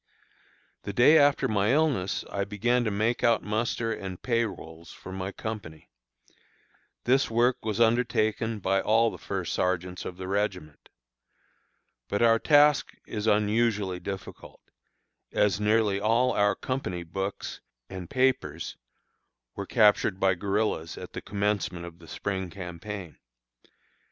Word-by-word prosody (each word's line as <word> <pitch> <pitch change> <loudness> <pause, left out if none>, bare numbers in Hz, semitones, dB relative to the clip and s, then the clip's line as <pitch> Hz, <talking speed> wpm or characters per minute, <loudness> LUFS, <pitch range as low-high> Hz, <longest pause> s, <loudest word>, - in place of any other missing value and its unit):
The 100 - -6
day 125 +9 +6
after 145 -1 +3
my 105 +1 +2
illness 140 -11 +1
I 100 - -1
began 115 +5 0
to - - +1
make 110 +4 0
out 115 -1 +3
muster 115 +1 -1
and 95 -4 -6
pay 115 -2 +1
rolls 80 -5 -9
for 95 - -11
my 95 +1 -4
company. 100 -8 -7 1.1
This 135 +3 +3
work 120 +2 +2
was 110 -1 -2
undertaken 115 -1 +1
by 95 -1 +1
all 115 +1 +3
the - - -10
first 95 -3 -3
sergeants 90 0 -1
of 90 - -7
the 95 0 -6
regiment. 95 -6 -3 1.2
But 100 +3 +1
our 115 -1 +5
task 145 +1 +4
is 105 0 -4
unusually 105 -3 +1
difficult, 95 +1 -8 0.7
as 105 -1 +2
nearly 105 -1 +2
all 115 +5 +2
our 100 -1 +2
company 95 -10 -3
books 95 +4 -5 0.3
and 95 -3 -8
papers 125 - 0 0.8
were 100 -1 -5
captured 105 -4 +3
by 95 -1 +3
guerillas 100 -3 -1
at - - -9
the - - -5
commencement 100 -4 -2
of 85 0 -11
the 85 - -15
spring 95 +2 -3
campaign. 90 0 -7
105 Hz, 135 wpm, -27 LUFS, 95-115 Hz, 1.2 s, day